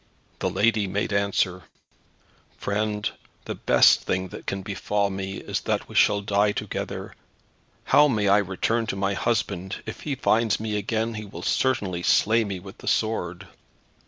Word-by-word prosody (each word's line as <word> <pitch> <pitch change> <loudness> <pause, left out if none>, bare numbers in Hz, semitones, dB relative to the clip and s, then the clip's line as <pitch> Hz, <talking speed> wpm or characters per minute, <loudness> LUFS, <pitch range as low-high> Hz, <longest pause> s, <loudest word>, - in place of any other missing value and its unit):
The - - 0
lady 110 -2 +2
made 100 +2 -2
answer, 100 -2 +1 1.0
"Friend, 105 0 -1 0.4
the - - -3
best - - +5
thing 95 0 -2
that - - -10
can 95 -1 -3
befall 100 +1 -1
me 95 0 -4
is - - -3
that - - -1
we - - -12
shall 105 -1 +4
die 100 0 +2
together. - - -5 0.7
How 150 0 +5
may 105 -7 +1
I 100 +1 +6
return 105 +4 -1
to 105 - -2
my 100 0 0
husband? 100 -3 -2
If 110 - -7
he 145 -3 -2
finds 115 -3 +2
me 110 -1 -3
again 110 +2 -1
he 105 -1 -6
will 100 - -9
certainly 100 -9 0
slay 110 +5 +3
me 100 -3 -4
with 95 +1 -12
the - - -11
sword." 90 -6 -1
100 Hz, 160 wpm, -25 LUFS, 95-110 Hz, 1.0 s, I